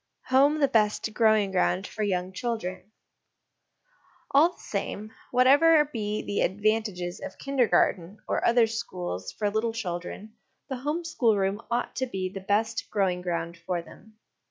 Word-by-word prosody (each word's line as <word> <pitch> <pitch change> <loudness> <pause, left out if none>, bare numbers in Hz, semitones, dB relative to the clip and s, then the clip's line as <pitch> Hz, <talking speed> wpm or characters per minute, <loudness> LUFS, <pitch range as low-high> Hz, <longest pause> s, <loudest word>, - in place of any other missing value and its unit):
Home 280 +4 +5
the 280 - +4
best 215 -3 +1
Growing 215 -3 +3
ground 185 0 +1
for 215 - -7
Young 185 -2 -1
Children. 195 -4 -4 1.4
All 320 +6 +5
the - - -25
same, 210 +1 -4 0.2
whatever 290 +5 +5
be 215 -6 -3
the 205 - -2
advan 215 +4 +2
tages 180 -4 -5
of - - -8
Kindergarten 215 -8 +1
or - - -1
other 235 0 +5
schools 185 - -5
for 205 -1 -2
little 220 +2 0
children, 195 0 -5 0.4
the 265 - -3
home 295 +7 -2
schoolroom 210 -9 +1
ought 240 +1 -2
to 260 - -1
be 190 -5 -3
the 195 - -5
best 220 +3 0
growing 190 -4 0
ground 170 -1 -3
for 170 +1 -3
them. 220 +5 -17
215 Hz, 150 wpm, -27 LUFS, 185-240 Hz, 1.4 s, Home